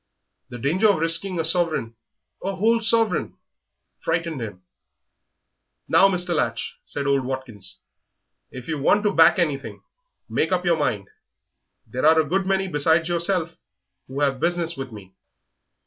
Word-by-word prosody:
...The 120 - -7
danger 165 - +2
of 200 - +3
risking 165 +3 0
a - - +1
sovereign 160 -9 0 0.5
a 195 +1 -2
whole 225 +4 +2
sovereign 225 0 +1 0.6
frightened 165 -4 -2
him. 100 -5 -7 1.2
"Now, 195 - +5
Mr. 180 -2 0
Latch," 115 -7 -2
said 140 - -5
old 140 -1 +2
Watkins, 125 -7 -6 0.7
"if 125 -1 -10
you 155 -2 -3
want 205 +8 +3
to 210 -1 +1
back 165 +1 +6
anything, 150 -6 -2 0.4
make - - -1
up 180 -1 0
your 170 -2 +3
mind; 105 -10 -1 0.8
there 125 +4 -5
are 160 0 +6
a 160 - +2
good 190 +4 0
many 190 0 +1
besides 160 +1 +1
yourself 170 0 -1 0.5
who 135 +2 -5
have 135 -2 +1
business 170 0 -1
with 135 -3 -6
me." 100 -3 -12
165 Hz, 150 wpm, -23 LUFS, 135-180 Hz, 1.2 s, back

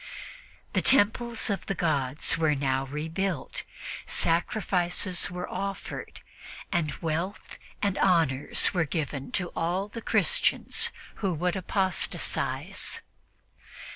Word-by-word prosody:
The - - +3
temples 235 -2 +4
of 195 - -3
the 195 - -1
gods 145 -4 +1
were 155 -2 +2
now 135 -1 0
rebuilt, 160 +3 -2 0.5
sacrifices 180 +1 +1
were 180 0 -5
offered, 195 0 -5 0.5
and 170 -5 +1
wealth 165 +5 -3 0.2
and 200 -2 +1
honors 160 -7 +3
were 175 -3 +2
given 145 -3 -3
to 180 -2 +1
all 180 +5 -1
the 230 +2 -7
Christians 485 - +2 0.3
who 195 -4 0
would 180 +4 0
apostatize. 190 0 -1
175 Hz, 105 wpm, -28 LUFS, 155-195 Hz, 0.5 s, temples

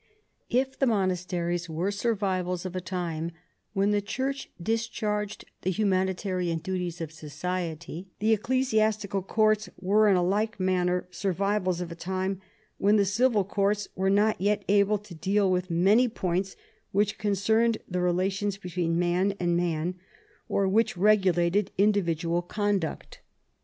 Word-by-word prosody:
If 265 +2 0
the 270 - +3
monasteries 180 -4 -1
were 170 +5 -1
survivals 190 -4 -1
of 185 0 -5
a 185 - -2
time 170 -2 -3 0.4
when 200 0 +2
the 205 0 +2
Church 265 +6 -3
discharged 215 0 -2 0.2
the 185 - -1
humanitarian 185 -3 0
duties 175 0 -4
of 160 -2 -4
society, 165 +2 -5
the 220 +2 +3
ecclesiastical 215 -4 +1
courts 215 +1 +2
were 205 +3 +4
in 195 - +5
a 180 - +2
like 210 +4 0
manner 180 -1 +1
survivals 195 -1 0
of 175 -1 -5
a - - -6
time 185 +2 -3 0.4
when 205 +2 +4
the 205 -2 +4
civil 215 +1 +2
courts 200 +1 0
were 190 +1 +1
not 205 0 +2
yet 205 +1 +1
able 205 +1 +4
to 205 -2 -13
deal 195 +3 +1
with 180 0 0
many 195 +9 +4
points 190 -3 -2 0.4
which 205 +1 +1
concerned 220 +3 +2
the 180 -1 -2
relations 190 +3 0
between 175 -3 -2
man 180 +3 +1
and 175 -1 +1
man, 175 +1 -1 0.5
or 195 - +1
which 210 0 +2
regulated 190 -1 +3
individual 175 -4 +2
conduct. 200 -1 -2
190 Hz, 140 wpm, -27 LUFS, 180-210 Hz, 0.5 s, in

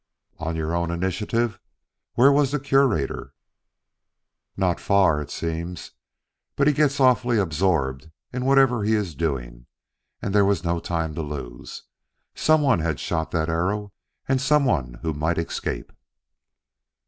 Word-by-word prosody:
"On 80 0 -3
your 80 0 -2
own 85 0 0
initiative? 105 +6 -1 0.6
Where 135 +4 +6
was 140 -1 +3
the 150 +2 -1
Curator?" 135 - +1 1.2
"Not 90 -2 +1
far, 95 -7 +3
it 75 - -7
seems. 85 +1 -5 0.6
But 140 - +2
he 150 - +4
gets 145 0 +1
awfully 125 -2 +3
absorbed 80 -6 0 0.2
in 125 0 -2
whatever 135 -4 +4
he 110 +2 +2
is 100 -6 -2
doing, 60 -6 -4 0.5
and 95 - -3
there 105 -1 +5
was 100 -4 +1
no 85 0 0
time 80 -2 -2
to 80 - -4
lose. 70 -6 -7 0.5
Some 155 -1 +3
one 135 -11 +3
had 80 -2 -1
shot 80 -1 -2
that 80 -1 -1
arrow, 95 +5 -1 0.4
some 140 +2 +3
one 70 - 0
who 80 -1 -1
might 80 +3 -1
escape." 85 - -4
90 Hz, 140 wpm, -24 LUFS, 80-125 Hz, 1.2 s, Where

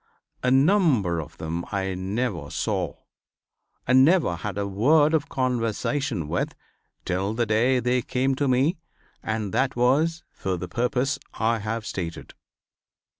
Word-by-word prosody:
A 125 - +1
number 135 - +3
of 75 - -8
them 80 +2 -3
I 95 -2 -1
never 95 - -3
saw, - - -2 0.9
and 130 +2 +6
never 155 - +3
had 100 +3 -5
a 100 - -1
word 145 +10 +3
of 155 -3 +1
conversation 125 - -1
with, 85 +3 -2 0.5
till 95 +4 -1
the 120 0 +1
day 120 +4 +2
they 125 +1 +1
came 130 +3 0
to 145 - +1
me 135 +6 +2 0.4
and 110 -3 -3
that 130 0 +1
was 145 +7 +2
for 95 -1 -3
the 90 +1 -5
purpose 130 +5 0 0.2
I 115 +1 +1
have 110 +2 -3
stated. 85 -5 -5
120 Hz, 140 wpm, -25 LUFS, 100-135 Hz, 0.9 s, and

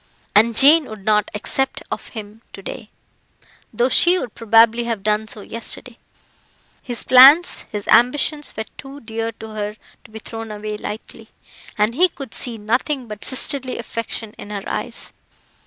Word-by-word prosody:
And 225 +2 +3
Jane 300 +3 +7
would 215 -5 -11
not 210 -1 +2
accept 270 +5 -1
of - - -5
him 215 -1 -10
to 195 - -11
day, 225 0 -8 0.8
though 240 - +1
she 350 +7 +4
would 250 -10 -5
probably 230 +1 +3
have 225 -4 -4
done 215 +1 0
so 215 -1 -4
yesterday. 230 +3 -3 0.8
His 240 -2 -4
plans, 275 +7 +6
his 205 -1 -6
ambitions, 295 +4 +3
were 220 - -3
too 275 +1 -10
dear 225 0 -4
to 220 0 -11
her 210 -1 -5 0.3
to - - -17
be 220 - -10
thrown 225 +1 -8
away 210 0 -5
lightly, 210 +1 -8 0.5
and 210 +2 +1
he 360 +8 +3
could 275 -7 -10
see 240 -3 -2
nothing 245 +5 -2
but 210 -1 -9
sisterly 260 0 +1
affection 230 -1 -5
in - - -10
her 200 -2 -5
eyes. - - -5
225 Hz, 160 wpm, -20 LUFS, 215-260 Hz, 0.8 s, Jane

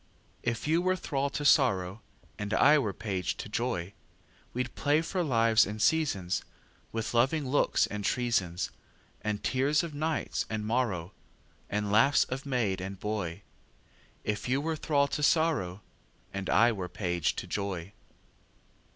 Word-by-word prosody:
If 120 +4 -2
you 165 +3 +3
were 185 +1 +2
thrall 140 -5 -1
to 145 +1 -4
sorrow, 100 -8 +3 0.4
And 105 -1 -1
I 150 +8 +6
were 110 -7 -1
page 95 -2 -3
to - - -6
joy, 105 -5 -2 0.6
We'd 125 0 -3
play 150 +2 +2
for 185 +2 -1
lives 115 -5 +4
and 105 +2 -5
seasonsWith 115 - -2
loving 135 +5 +2
looks 145 +3 +3
and 105 0 -5
treasonsAnd 105 -1 -2
tears 140 +5 +2
of 165 -3 -5
night 155 +1 -1
and 110 -1 -3
morrowAnd 105 -7 -1 0.8
laughs 115 +7 +5
of 135 +2 -5
maid 110 -8 0
and 95 0 -6
boy; 100 -3 -3 0.8
If 105 +3 -2
you 130 +2 +2
were 160 +2 -1
thrall 145 -2 +2
to - - -2
sorrow, 145 - +2 0.5
And 100 0 -4
I 120 +1 +5
were 95 -5 -4
page 90 -1 -1
to - - -4
joy. 100 -2 -4
115 Hz, 140 wpm, -30 LUFS, 100-140 Hz, 0.8 s, I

